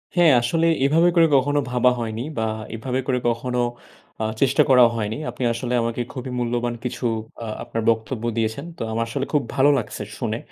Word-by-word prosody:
হ্যাঁ, 175 -3 +6
আসলে 165 +8 +1 0.2
এভাবে 165 +5 +4
করে 165 -1 +6
কখনো 145 +2 +3
ভাবা 125 0 +4
হয়নি 115 -1 -3 0.2
বা 110 - 0 0.3
এভাবে 125 +3 -2
করে 125 -2 +1
কখনো 125 +1 -2 0.6
আ - - 0 0.2
চেষ্টা 135 0 +4
করা 125 -2 +7
হয়নি। 110 -1 -2
আপনি - - -5
আসলে 120 +1 -3
আমাকে 115 +1 -2
খুবই 130 -1 -6
মূল্যবান 120 0 -1
কিছু 125 0 -4 0.4
আ - - -5 0.2
আপনার 115 - -3
বক্তব্য 110 +1 -1
দিয়েছেন। 110 +6 -1
তো - - -9
আমার 115 +1 0
আসলে 135 +3 -2
খুব 150 - +3
ভালো 140 +1 +5
লাগছে 110 -3 -4 0.2
শুনে। 115 -3 -2
125 Hz, 185 wpm, -22 LUFS, 115-135 Hz, 0.6 s, করা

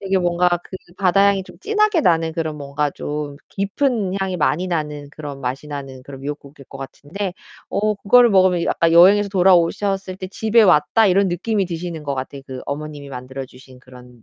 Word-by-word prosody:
되게 195 -1 0
뭔가 175 0 +2
그 185 - -9 0.2
바다 195 +1 +4
향이 200 -1 +2
좀 - - -15
진하게 425 -3 +1
나는 165 - +2
그런 160 -2 -3
뭔가 145 0 -2
좀 145 0 -5
깊은 200 0 -1
향이 190 -1 -2
많이 165 +2 0
나는 150 -4 -3
그런 145 -2 -8
맛이 130 +3 -4
나는 135 -3 -7
그런 135 -1 -10
미역국일 140 0 -8
것 135 - -10
같은데 170 +8 -6 0.4
어 215 +1 0
그거를 235 +4 +5
먹으면 185 -3 +3
아까 165 -1 +2
여행에서 200 +4 +6
돌아오셨을 190 +1 +2
때 185 0 -7
'집에 220 +3 +2
왔다.' 190 +4 +4
이런 195 +2 +3
느낌이 195 +3 -1
드시는 170 -2 -5
것 140 -1 -2
같아요. 135 +1 -6
그 130 -1 -7
어머님이 145 0 -6
만들어 130 +1 -7
주신 130 0 -16
그런 125 -2 -16
170 Hz, 385 characters per minute, -20 LUFS, 140-195 Hz, 0.4 s, 여행에서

